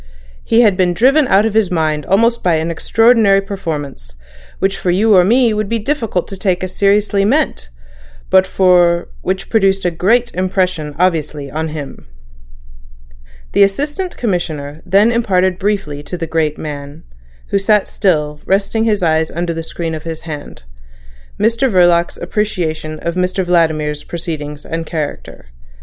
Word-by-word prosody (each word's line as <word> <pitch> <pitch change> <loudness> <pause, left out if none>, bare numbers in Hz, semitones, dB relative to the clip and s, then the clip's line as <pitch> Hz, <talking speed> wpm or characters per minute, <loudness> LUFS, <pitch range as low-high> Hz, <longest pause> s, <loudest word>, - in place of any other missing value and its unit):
He 230 +1 +3
had 210 -5 +4
been 180 -1 +1
driven 270 - +4
out 200 0 +4
of 225 - -1
his 215 -4 +2
mind 155 -4 -1
almost 230 +5 +2
by 175 -2 +2
an 160 +1 -1
extraordinary 225 +2 +3
performance, 150 - -6 0.4
which 195 0 0
for 180 - -3
you 205 +4 +3
or 180 - +6
me 235 +5 +3
it - - 0
would 215 -1 -2
be 230 - 0
difficult 225 - -2
to 195 - -6
take 185 -1 -1
as 185 - -4
seriously 200 0 +2
meant, 250 - 0 0.6
but 190 0 +5 0.7
which 190 +1 -3
produced 195 -4 +2
a 175 - +2
great 230 +9 +1
impression 180 -5 -1
obviously 155 -5 -1
on 160 +2 -3
him." 150 - -8 1.4
The - - +2
Assistant 295 - 0
Commissioner 160 -8 -3
then 200 +5 +4
imparted 190 -6 +1
briefly 195 -8 -2
to 180 +4 -6
the 165 - -3
great 160 -2 -1
man, 145 0 -7 0.5
who 200 - +1
sat 210 0 +2
still, 150 -7 -1
resting 205 +3 +1
his 210 -4 +1
eyes 160 -1 +1
under 170 0 -3
the 165 - -4
screen 165 0 -5
of 155 - -5
his 165 -1 -6
hand, 150 - -8 0.8
Mr 230 +4 +2
Verloc's 175 -3 +3
appreciation 170 -5 -3
of 170 - -2
Mr 185 +1 -1
Vladimir's 155 -4 0
proceedings 150 -4 -6
and 165 0 -4
character. 150 - -6
180 Hz, 155 wpm, -16 LUFS, 160-205 Hz, 1.4 s, or